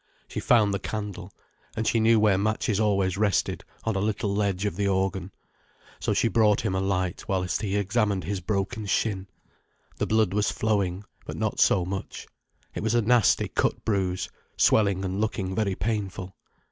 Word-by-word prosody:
She -, -, -5 dB
found 110 Hz, -5 st, +3 dB
the 100 Hz, -, -1 dB
candle. 100 Hz, -4 st, -5 dB, 0.4 s
And 110 Hz, 0 st, -2 dB
she 115 Hz, -, +2 dB
knew 110 Hz, 0 st, +5 dB
where 105 Hz, -2 st, +4 dB
matches 110 Hz, 0 st, 0 dB
always 100 Hz, -3 st, +1 dB
rested, 105 Hz, -4 st, +1 dB, 0.2 s
on 110 Hz, -2 st, -1 dB
a -, -, +1 dB
little 105 Hz, -1 st, -1 dB
ledge 100 Hz, -1 st, 0 dB
of 105 Hz, -, -1 dB
the 100 Hz, -1 st, 0 dB
organ. 95 Hz, -1 st, -1 dB, 0.7 s
So -, -, -1 dB
she -, -, +2 dB
brought 105 Hz, -1 st, +3 dB
him 110 Hz, -4 st, -1 dB
a 95 Hz, -, 0 dB
light, 95 Hz, -2 st, -1 dB
whilst 90 Hz, -2 st, -1 dB
he 100 Hz, -2 st, -2 dB
examined 100 Hz, -1 st, 0 dB
his 100 Hz, +4 st, -2 dB
broken 100 Hz, +4 st, -2 dB
shin. 95 Hz, -1 st, 0 dB, 0.7 s
The -, -, -1 dB
blood 110 Hz, -3 st, +2 dB
was 105 Hz, 0 st, +1 dB
flowing, 100 Hz, -3 st, 0 dB, 0.2 s
but -, -, -5 dB
not -, -, -2 dB
so 90 Hz, -, +4 dB
much. 95 Hz, +1 st, -5 dB, 0.5 s
It -, -, -4 dB
was 110 Hz, +2 st, 0 dB
a 120 Hz, -, +3 dB
nasty 120 Hz, -1 st, +3 dB
cut -, -, -1 dB
bruise, 95 Hz, -4 st, 0 dB, 0.3 s
swelling 100 Hz, -3 st, +3 dB
and 95 Hz, +2 st, -2 dB
looking 95 Hz, -3 st, -2 dB
very 100 Hz, -2 st, 0 dB
painful. 95 Hz, -2 st, -3 dB
100 Hz, 175 wpm, -26 LUFS, 95-110 Hz, 0.7 s, knew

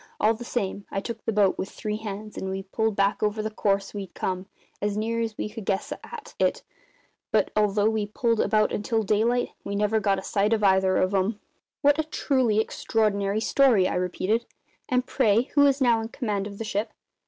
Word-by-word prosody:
All 220 Hz, -, +4 dB
the 230 Hz, +2 st, -8 dB
same, 200 Hz, -4 st, -3 dB
I 195 Hz, -, -2 dB
took 225 Hz, +2 st, -6 dB
the -, -, +1 dB
boat, 205 Hz, -3 st, +2 dB
with 190 Hz, -, -3 dB
three 210 Hz, 0 st, -4 dB
hands, 215 Hz, 0 st, -7 dB
and 190 Hz, -, -4 dB
we 190 Hz, 0 st, -3 dB
pulled 220 Hz, +2 st, -1 dB
back 200 Hz, 0 st, +1 dB
over 215 Hz, 0 st, 0 dB
the 215 Hz, -, -3 dB
course 200 Hz, -2 st, 0 dB
we'd 200 Hz, -3 st, -7 dB
come; 185 Hz, 0 st, -3 dB, 0.3 s
as 205 Hz, 0 st, -1 dB
near 230 Hz, +2 st, -1 dB
as 225 Hz, -2 st, -3 dB
we -, -, -2 dB
could 215 Hz, +1 st, -8 dB
guess 195 Hz, 0 st, -1 dB
at 475 Hz, 0 st, -9 dB
it; -, -, +1 dB, 0.7 s
but -, -, +2 dB
although 210 Hz, 0 st, +3 dB
we 220 Hz, -2 st, 0 dB
pulled 230 Hz, +1 st, 0 dB
about 215 Hz, +1 st, +2 dB
until 220 Hz, +2 st, 0 dB
daylight. 225 Hz, +4 st, +1 dB
We 200 Hz, -, -4 dB
never 210 Hz, +2 st, +2 dB
got 200 Hz, -2 st, +1 dB
a 190 Hz, -, -5 dB
sight 205 Hz, +2 st, +1 dB
of 215 Hz, -2 st, 0 dB
either 190 Hz, -1 st, +4 dB
of 185 Hz, +2 st, +1 dB
'em." 200 Hz, +3 st, 0 dB, 0.4 s
"What 290 Hz, +1 st, +4 dB
a -, -, +2 dB
truly 260 Hz, -7 st, +1 dB
extraordinary 210 Hz, -2 st, 0 dB
story!" 230 Hz, -7 st, +4 dB
I -, -, -2 dB
repeated. 185 Hz, +5 st, -1 dB, 0.4 s
"And, 250 Hz, -1 st, +1 dB
pray, 220 Hz, 0 st, +3 dB
who 285 Hz, -1 st, +6 dB
is 275 Hz, 0 st, +2 dB
now 240 Hz, -4 st, +3 dB
in 225 Hz, -, -4 dB
command 210 Hz, -5 st, -2 dB
of 200 Hz, -1 st, -9 dB
the 225 Hz, -, -4 dB
ship?" 210 Hz, +1 st, -2 dB
215 Hz, 210 wpm, -26 LUFS, 200-225 Hz, 0.7 s, who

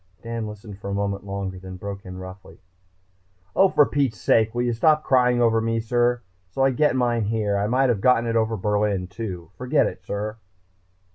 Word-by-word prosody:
Dan 115 Hz, -1 st, -4 dB
listened 105 Hz, -1 st, -10 dB
a 100 Hz, -, -4 dB
moment 100 Hz, 0 st, -2 dB
longer 95 Hz, -1 st, -4 dB
then 95 Hz, 0 st, -9 dB
broke 100 Hz, +1 st, -7 dB
in 90 Hz, 0 st, -8 dB
roughly. 95 Hz, +1 st, -10 dB, 1.0 s
"Oh, 195 Hz, -, +5 dB
for 145 Hz, -, +5 dB
Pete's 135 Hz, -7 st, -1 dB
sake, 110 Hz, 0 st, +2 dB
will 120 Hz, -, +1 dB
you 120 Hz, -1 st, 0 dB
stop 155 Hz, +6 st, +3 dB
crying 125 Hz, -2 st, +3 dB
over 115 Hz, -1 st, +3 dB
me, 115 Hz, 0 st, 0 dB
sir? 120 Hz, +1 st, +1 dB, 0.3 s
So 135 Hz, +9 st, -1 dB
I 135 Hz, -, +4 dB
get 150 Hz, +2 st, +2 dB
mine 120 Hz, -3 st, +1 dB
here. 105 Hz, -1 st, 0 dB
I 100 Hz, +1 st, 0 dB
might 130 Hz, +3 st, +2 dB
have 110 Hz, -5 st, 0 dB
gotten 125 Hz, -1 st, +4 dB
it 115 Hz, 0 st, -1 dB
over 110 Hz, 0 st, +1 dB
Berlin, 105 Hz, -1 st, 0 dB
too. 90 Hz, -4 st, -7 dB
Forget 125 Hz, +4 st, +2 dB
it -, -, -5 dB
sir." 105 Hz, +3 st, -4 dB
110 Hz, 195 wpm, -23 LUFS, 100-120 Hz, 1.0 s, Oh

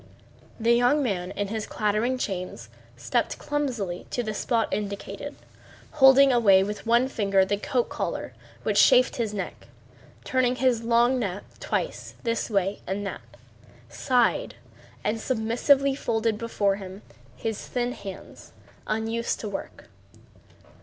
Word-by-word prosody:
The 230 Hz, +1 st, +4 dB
young 245 Hz, +5 st, +3 dB
man 185 Hz, -7 st, -2 dB
in 200 Hz, +1 st, -3 dB
his 220 Hz, 0 st, -3 dB
clattering 215 Hz, +5 st, 0 dB
chains 180 Hz, -, -4 dB, 0.3 s
stepped 235 Hz, -, -1 dB
clumsily 245 Hz, -12 st, -3 dB
to 245 Hz, -, -2 dB
the 215 Hz, -1 st, -3 dB
spot 225 Hz, +2 st, 0 dB
indicated, 200 Hz, -1 st, -4 dB, 0.6 s
holding 270 Hz, -1 st, +7 dB
away 200 Hz, -6 st, +5 dB
with 210 Hz, +3 st, -5 dB
one 240 Hz, +2 st, +4 dB
finger 195 Hz, -6 st, +2 dB
the 205 Hz, +1 st, 0 dB
coat 245 Hz, +3 st, 0 dB
collar -, -, -4 dB, 0.3 s
which -, -, +4 dB
chafed -, -, +5 dB
his 230 Hz, -3 st, -1 dB
neck, 200 Hz, -3 st, -6 dB, 0.6 s
turned 255 Hz, -1 st, +1 dB
his 255 Hz, -3 st, +2 dB
long 235 Hz, +2 st, +3 dB
neck 200 Hz, -3 st, -3 dB, 0.2 s
twice -, -, -3 dB
this 230 Hz, -1 st, -1 dB
way 195 Hz, -1 st, 0 dB
and 200 Hz, +2 st, -2 dB
that, 195 Hz, -, -5 dB, 0.7 s
sighed, 250 Hz, -3 st, +1 dB, 0.5 s
and 225 Hz, -, -1 dB
submissively 260 Hz, +4 st, +2 dB
folded 225 Hz, -4 st, -1 dB
before 205 Hz, -4 st, 0 dB
him 190 Hz, 0 st, -9 dB, 0.3 s
his 220 Hz, -2 st, -4 dB
thin 245 Hz, -1 st, -1 dB
hands, 195 Hz, -6 st, -10 dB, 0.3 s
unused 225 Hz, +2 st, -1 dB
to 215 Hz, -, -4 dB
work. 195 Hz, -, -7 dB
225 Hz, 135 wpm, -26 LUFS, 200-245 Hz, 0.7 s, holding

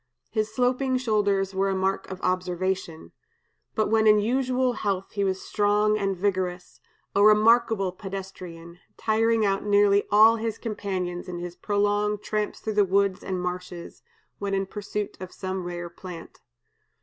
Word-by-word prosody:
His 215 Hz, -1 st, -1 dB
sloping 255 Hz, +2 st, +1 dB
shoulders 205 Hz, -5 st, +1 dB
were 195 Hz, +1 st, +1 dB
a 195 Hz, -, 0 dB
mark 190 Hz, +1 st, -1 dB
of 190 Hz, -1 st, -6 dB
observation. 185 Hz, -2 st, -2 dB, 0.6 s
But 215 Hz, -2 st, +1 dB
when 220 Hz, 0 st, +3 dB
in 210 Hz, 0 st, +7 dB
usual 255 Hz, +3 st, +1 dB
health 195 Hz, -4 st, -2 dB
he 200 Hz, -, -1 dB
was 190 Hz, -1 st, -1 dB
strong 210 Hz, +1 st, +2 dB
and 195 Hz, -2 st, -1 dB
vigorous, 180 Hz, -7 st, -2 dB, 0.4 s
a 200 Hz, -, +4 dB
remarkable 215 Hz, -2 st, +4 dB
pedestrian, 180 Hz, -3 st, -8 dB, 0.2 s
tiring 225 Hz, 0 st, +2 dB
out 195 Hz, 0 st, 0 dB
nearly 205 Hz, -1 st, +4 dB
all 220 Hz, +2 st, +7 dB
his 225 Hz, -1 st, -3 dB
companions 190 Hz, -5 st, -4 dB
in 175 Hz, -, -5 dB
his 175 Hz, 0 st, -6 dB
prolonged 205 Hz, +1 st, 0 dB
tramps 210 Hz, -1 st, -2 dB
through 210 Hz, -1 st, +1 dB
woods 195 Hz, 0 st, +1 dB
and 185 Hz, -1 st, -3 dB
marshes, 180 Hz, -1 st, -6 dB, 0.4 s
when 200 Hz, -1 st, -1 dB
in 195 Hz, 0 st, 0 dB
pursuit 205 Hz, +1 st, -5 dB
of 185 Hz, -1 st, -8 dB
some 185 Hz, -1 st, -4 dB
rare 175 Hz, 0 st, -5 dB
plant. 170 Hz, -1 st, -10 dB
200 Hz, 150 wpm, -26 LUFS, 185-215 Hz, 0.6 s, in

